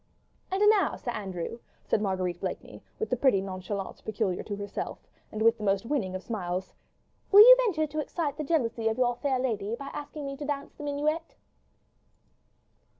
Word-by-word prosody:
"And 390 +2 +3
now, 410 -3 +2
Sir 240 - -4
Andrew," 195 0 -5 0.2
said - - 0
Marguerite 185 -3 -1
Blakeney, - - -6 0.2
with 445 - -3
the - - +3
pretty 250 -5 +3
nonchalance 190 +1 -5
peculiar 205 -4 -1
to 205 - -5
herself, 200 0 -5 0.3
and 215 0 -2
with 230 0 +4
the - - -6
most 195 +1 +1
winning 230 -9 -1
of 185 - -5
smiles, 185 -4 -4 0.6
"will 405 +1 +10
you - - +11
venture 315 -7 +1
to 305 +1 -4
excite 300 -1 -2
the 305 - -2
jealousy 240 -7 0
of 220 - 0
your 245 -1 +2
fair 275 -3 0
lady 225 -4 -1
by 275 +3 -8
asking 295 0 -6
me 275 0 -4
to 295 - -5
dance 280 -1 -4
the - - -12
minuet?" 300 +3 -2
235 Hz, 180 wpm, -28 LUFS, 200-295 Hz, 0.6 s, you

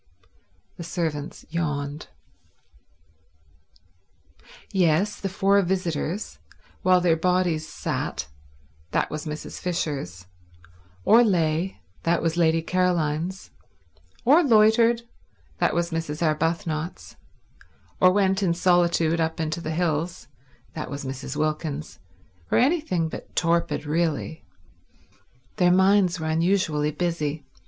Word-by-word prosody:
The 170 - -6
servants 160 -4 -4
yawned. 150 -3 -3 2.7
Yet 180 +1 +3
the 195 - -2
four 195 +1 +3
visitors, 180 0 -2 0.4
while 185 0 +4
their 170 -2 +3
bodies 175 -2 +1
sat—that 75 +1 -5
was 155 +1 -5
Mrs. 150 0 -6
Fisher's—or 90 - -1
lay—that 165 - 0
was 165 0 -1
Lady 165 -1 +2
Caroline's—or 170 - -1
loitered—that 230 -1 +1
was 170 0 0
Mrs. 165 -1 -3
Arbuthnot's—or 165 +3 -2
went 195 0 +2
in 175 -3 +1
solitude 170 -2 +2
up 160 0 -1
into 160 +1 -2
the 155 - -5
hills—that 150 -5 -4
was 140 0 -6
Mrs. 135 +1 -5
Wilkins's—were 140 - -4
anything 255 - +2
but - - -9
torpid 170 -2 +1
really. 160 -2 -1 1.1
Their 180 -1 +4
minds 190 -1 +4
were 160 - -4
unusually 160 -2 +1
busy. 155 -2 -2
165 Hz, 90 wpm, -25 LUFS, 145-180 Hz, 2.7 s, while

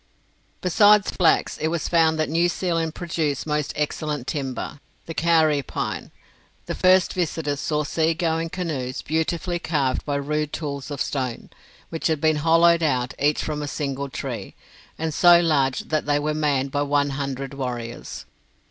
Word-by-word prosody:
Besides 205 +3 +5
flax, 175 -4 +2
it 155 - 0
was 165 0 -1
found 160 -2 +3
that 155 - 0
New 170 +3 +2
Zealand 165 -3 -1
produced 155 -5 -2
most 150 -1 -1
excellent 150 -2 -2
timber 135 0 -4 0.3
the 165 - -6
kauri 160 -3 +3
pine. - - -4 0.6
The - - -3
first 185 0 +4
visitors 155 -5 -2
saw 150 0 0
sea 160 +2 0
going 165 0 -1
canoes 155 -8 -4
beautifully 170 +3 -1
carved 140 -6 0
by 145 - -2
rude 150 +1 -1
tools 140 -3 -4
of 145 -2 -4
stone, 130 -4 -3 0.4
which 165 - -2
had 160 -3 0
been 155 0 +2
hollowed 165 +2 +4
out, 130 -4 0
each 145 +2 +2
from 150 -1 -3
a 145 - -3
single 140 -1 -3
tree, - - -6 0.4
and 160 -1 -2
so 175 +2 +7
large 140 -6 +2
that 155 -2 -2
they 145 0 +3
were 150 +1 -1
manned 140 -3 0
by 145 - 0
one 145 0 +1
hundred 135 0 -4
warriors. 120 -3 -5
150 Hz, 160 wpm, -23 LUFS, 140-165 Hz, 0.6 s, so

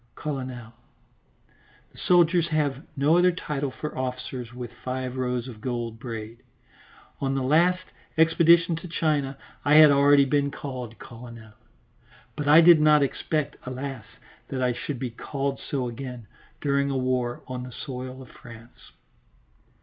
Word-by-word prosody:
("Colonel" 130 -5 -5 1.2
the - - -21
soldiers 175 -1 +3
have 145 -4 0 0.2
no 150 +5 +4
other 180 0 +5
title 150 -5 -3
for 150 +3 -7
officers 125 -1 -5
with 120 -1 -7
five 130 0 -3
rows 125 -1 -2
of 110 -4 -10
gold 120 -2 -4
braid. 115 -1 -7 0.8
On 135 -1 -1
the 135 - -1
last 175 +7 +3 0.3
expedition 165 +1 +5
to 170 - -8
China 150 -5 -1 0.3
I 145 +1 +4
had 155 -1 +9
already 140 0 +5
been 140 +1 +1
called 125 -5 -7
colonel, 115 -2 -11 0.8
but 150 - -4
I 155 +3 +8
did 170 -2 +7
not 150 -1 +5
expect, 150 +2 -2
alas! 130 -2 -6 0.4
that 130 -1 -3
I 125 -1 +2
should 135 +3 -5
be 125 0 -4
called 135 +3 -4
so 130 -3 -3
again 125 -1 -7 0.4
during 140 0 +1
a 135 - -1
war 125 -2 -1
on 125 -1 -5
the 125 0 -8
soil 130 +1 -7
of 125 - -16
France.) 115 0 -15
135 Hz, 145 wpm, -25 LUFS, 125-150 Hz, 1.2 s, had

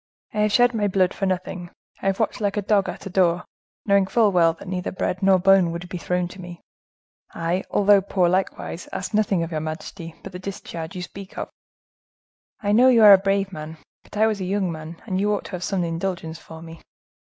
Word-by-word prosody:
I 215 - -2
have 210 0 +2
shed 245 +2 +4
my 210 -2 0
blood 185 -2 +2
for 195 - -2
nothing; 180 -1 -3 0.3
I - - -2
have 195 0 0
watched 220 - -1
like 205 0 0
a 205 - 0
dog 200 -1 +2
at - - -8
a - - -5
door, 175 -2 +2 0.4
knowing 200 -2 +3
full 220 0 +3
well 170 -3 +4
that 165 - -13
neither 180 -1 -3
bread 185 0 -2
nor 190 -1 +5
bone 190 -1 +4
would 170 +1 -6
be 180 - -5
thrown 180 +1 -1
to 185 - -11
me. 175 -1 -9 0.8
I, 170 +3 -1
although 205 -1 +4
poor 185 -2 +1
likewise, 185 -1 -2
asked 195 - -5
nothing 205 -5 +2
of 165 - -6
your 155 - -1
majesty 160 +2 -7
but - - -8
the 180 - -8
discharge 175 -4 -7
you 180 - -4
speak 195 +1 -10
of." - - -5 1.1
"I 205 -1 0
know 245 +5 +6
you 235 -3 +5
are 205 -1 +11
a 195 - +7
brave 195 0 0
man, 155 0 -7 0.2
but - - -12
I 215 - +4
was 215 -3 0
a - - -2
young 190 -1 -1
man, 160 +1 -8
and 190 -3 -1
you 210 +1 +1
ought - - -6
to - - -9
have 180 -2 -5
had - - -2
some 190 -3 0
indulgence 165 -1 -3
for 160 0 -11
me. 165 0 -11
185 Hz, 230 wpm, -23 LUFS, 175-200 Hz, 1.1 s, are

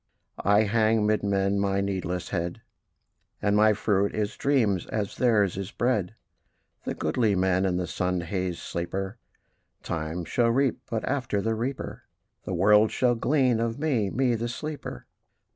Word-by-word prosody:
I 100 +2 +4
hang 110 0 +2
'mid 105 0 +2
men 100 0 +1
my 100 0 +1
needless 90 -3 -2
head, 85 -2 -3 0.8
And 100 0 +1
my 110 +1 +5
fruit 100 -1 0
is 105 0 -2
dreams, 110 - +1
as 105 -3 -3
theirs 105 -7 +2
is 95 -2 -4
bread: 115 -5 -1 0.7
The - - -2
goodly 110 -5 +1
men 95 0 +2
and 90 -1 0
the 90 - -1
sun 90 +1 -1
hazed 90 0 -3
sleeper 95 +5 -4 0.6
Time 80 +1 -3
shall 115 +7 +2
reap; 135 +2 +1
but 110 -2 -2
after 120 -7 -1
the 115 +3 0
reaper 125 +5 -4 0.4
The 95 - -2
world 105 +4 +5
shall 125 -1 +2
glean 125 -1 +2
of 115 0 -1
me, 135 -10 0
me 125 +3 +1
the 115 +1 -2
sleeper! 145 - -6
105 Hz, 155 wpm, -26 LUFS, 95-115 Hz, 0.8 s, my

